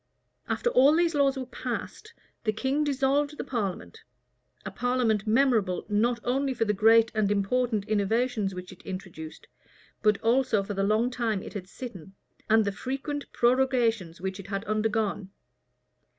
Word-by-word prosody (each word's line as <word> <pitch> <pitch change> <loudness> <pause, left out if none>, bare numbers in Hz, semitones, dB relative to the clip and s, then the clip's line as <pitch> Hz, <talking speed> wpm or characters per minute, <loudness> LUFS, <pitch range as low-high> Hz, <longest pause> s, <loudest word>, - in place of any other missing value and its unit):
After 480 - 0
all 280 - +6
these 340 0 +2
laws 280 -2 +2
were 260 - -4
passed, 435 - -6 0.3
the 215 - +1
king 265 +7 0
dissolved 285 +1 +1
the - - -3
parliament; 205 -8 -4 0.7
a - - -4
parliament 240 -4 0
memorable, 220 -6 +2
not 235 +3 +1
only 265 +2 0
for 225 - +1
the 210 - +1
great 225 +2 +5
and 215 -2 +1
important 210 +1 0
innovations 215 -1 0
which 180 0 -8
it 190 - -14
introduced, 185 -5 -8 0.6
but 210 -2 +3
also 230 -3 +2
for 205 - -5
the 195 - -1
long 215 +5 +2
time 225 -5 -1
it - - -9
had 190 -3 -7
sitten, 195 -7 -9 0.3
and 220 0 +5
the 200 - 0
frequent 270 +7 -5
prorogations 240 -8 +1
which 190 +2 -4
it 195 - -9
had 195 0 -3
undergone. 215 -2 -1
225 Hz, 155 wpm, -27 LUFS, 200-255 Hz, 0.7 s, all